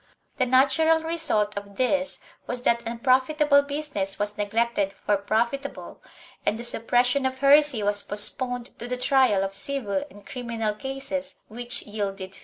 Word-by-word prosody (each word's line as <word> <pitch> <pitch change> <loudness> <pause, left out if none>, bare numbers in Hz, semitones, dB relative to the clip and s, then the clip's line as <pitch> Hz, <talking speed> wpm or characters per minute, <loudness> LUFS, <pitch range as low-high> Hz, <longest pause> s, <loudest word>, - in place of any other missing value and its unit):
The 255 -3 +1
natural 300 +6 +4
result 320 -11 0
of 200 0 -7
this 275 +3 0 0.3
was 245 0 -3
that 235 -1 +2
unprofitable 270 +5 +3
business 280 -10 -3
was 205 0 -2
neglected 210 -1 0
for 205 +1 0
profitable, 235 +8 -2 0.4
and 215 - 0
the 235 - -7
suppression 245 +3 +2
of 260 0 -5
heresy 280 -3 +5
was 205 0 +1
post 205 0 +2
poned 245 -2 -4
to 240 - -6
the 250 0 -3
trial 250 -6 +3
of 195 0 -3
civil 275 +3 -2
and 205 -5 -16
criminal 230 -4 -3
cases 270 +4 -4
which 240 +2 -5
yielded 195 -3 -5
fees. - - -14
245 Hz, 155 wpm, -25 LUFS, 210-275 Hz, 0.4 s, heresy